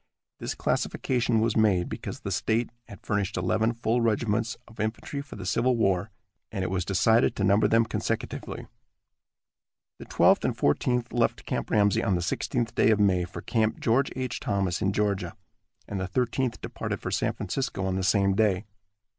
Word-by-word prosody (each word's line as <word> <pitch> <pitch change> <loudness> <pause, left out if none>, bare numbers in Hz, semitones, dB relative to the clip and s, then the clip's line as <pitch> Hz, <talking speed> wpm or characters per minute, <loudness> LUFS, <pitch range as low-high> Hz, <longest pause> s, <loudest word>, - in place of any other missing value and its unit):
This - - -4
classification 120 -3 0
was 115 0 +1
made 100 -5 +3
because - - -6
the - - -4
state 115 +2 0 0.2
had 100 - -13
furnished 100 -3 -1
eleven 110 +5 +1
full 115 +1 0
regiments 115 0 0
of 110 - -17
infantry 110 +6 -3
for 140 - -11
the 95 -3 -7
Civil 120 +6 +2
War, 95 -2 +1 0.4
and 100 -3 -2
it 95 - -2
was 95 -1 0
decided 110 +5 +3
to 100 - -2
number 100 +2 +4
them 115 0 +4
consecutively. - - -4 1.3
The - - -9
Twelfth - - +4
and - - -1
Fourteenth 120 - +1
left 120 -1 0
Camp - - -3
Ramsey 105 -1 +3
on 95 - +2
the 85 - -1
sixteenth 115 +6 -1
day - - +3
of 110 -2 +3
May 95 -3 +3
for 85 - -8
Camp 110 -2 0
George 130 +5 +2
H. 130 -2 -3
Thomas 95 -3 -1
in 95 - +2
Georgia, 100 -1 -1 0.5
and 100 - -4
the 95 - -2
Thirteenth 125 +3 -1
departed - - -4
for - - -5
San - - 0
Francisco 125 -8 -3
on 95 -1 -1
the 95 - -1
same 100 0 +3
day. 105 -1 +2
110 Hz, 180 wpm, -27 LUFS, 95-115 Hz, 1.3 s, number